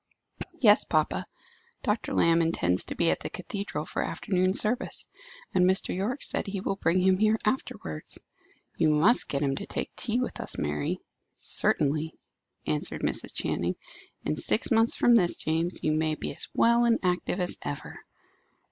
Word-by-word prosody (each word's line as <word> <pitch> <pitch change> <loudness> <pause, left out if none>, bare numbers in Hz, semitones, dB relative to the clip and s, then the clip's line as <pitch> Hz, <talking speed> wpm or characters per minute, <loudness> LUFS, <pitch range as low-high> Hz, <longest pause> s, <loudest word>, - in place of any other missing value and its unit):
"Yes, 220 -8 +5
papa. - - 0 0.6
Dr. 215 -2 -1
Lamb 165 0 +4
intends 90 - +2
to - - -6
be 170 -1 +3
at - - -1
the - - -5
cathedral 185 -4 -5
for - - -3
afternoon 185 -1 0
service, 225 +3 0 0.5
and 180 - +3
Mr. 190 -1 +2
Yorke 220 +9 -2
said - - -2
he 195 0 -3
would 195 +1 -3
bring 170 +3 +2
him 190 0 +3
here 215 +1 +3
afterwards." 80 - -2 0.6
"You 155 - +2
must 165 +11 +4
get 140 +1 -1
him 135 -1 0
to - - -5
take - - -4
tea 235 +1 +1
with 250 - -3
us, - - -3
Mary." 75 0 -2 0.3
"Certainly," 155 +2 +1 0.5
answered 75 -1 -2
Mrs. - - -1
Channing. 85 +2 -1 0.5
"In 75 - 0
six 225 - 0
months 225 0 +4
from 240 - +4
this, 180 -7 +4
James, 165 +3 -2
you 155 - +2
may 155 0 0
be - - -5
as - - -6
well 235 +1 +4
and 230 -1 +4
active 180 +1 0
as 180 -1 0
ever." 145 - -6
180 Hz, 165 wpm, -27 LUFS, 155-215 Hz, 0.6 s, Yes